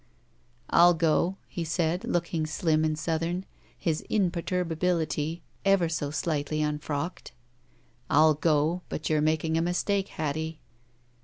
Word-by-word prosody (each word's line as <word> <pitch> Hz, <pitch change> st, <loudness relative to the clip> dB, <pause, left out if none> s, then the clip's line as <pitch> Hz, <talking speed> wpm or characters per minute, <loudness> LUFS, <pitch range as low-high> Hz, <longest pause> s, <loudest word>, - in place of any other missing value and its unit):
"I'll 175 Hz, 0 st, +7 dB
go," 170 Hz, +3 st, +2 dB
he 175 Hz, -, -4 dB
said, 165 Hz, +2 st, -1 dB
looking 170 Hz, -2 st, -1 dB
slim 155 Hz, 0 st, +1 dB
and 155 Hz, -1 st, 0 dB
Southern, 165 Hz, +3 st, -2 dB, 0.3 s
his 160 Hz, -5 st, -1 dB
imperturbability 170 Hz, -4 st, 0 dB, 0.2 s
ever 195 Hz, -3 st, +4 dB
so 150 Hz, -3 st, -2 dB
slightly 155 Hz, 0 st, -1 dB
unfrocked 150 Hz, +2 st, -3 dB, 0.4 s
— -, -, -35 dB, 0.3 s
"I'll 155 Hz, +2 st, +6 dB
go, 155 Hz, +3 st, +1 dB
but 155 Hz, -, -3 dB
you're 155 Hz, -1 st, +3 dB
making 160 Hz, +1 st, +1 dB
a -, -, +1 dB
mistake, 190 Hz, +3 st, 0 dB
Hattie." 160 Hz, +1 st, -3 dB
160 Hz, 125 wpm, -28 LUFS, 155-175 Hz, 0.4 s, I'll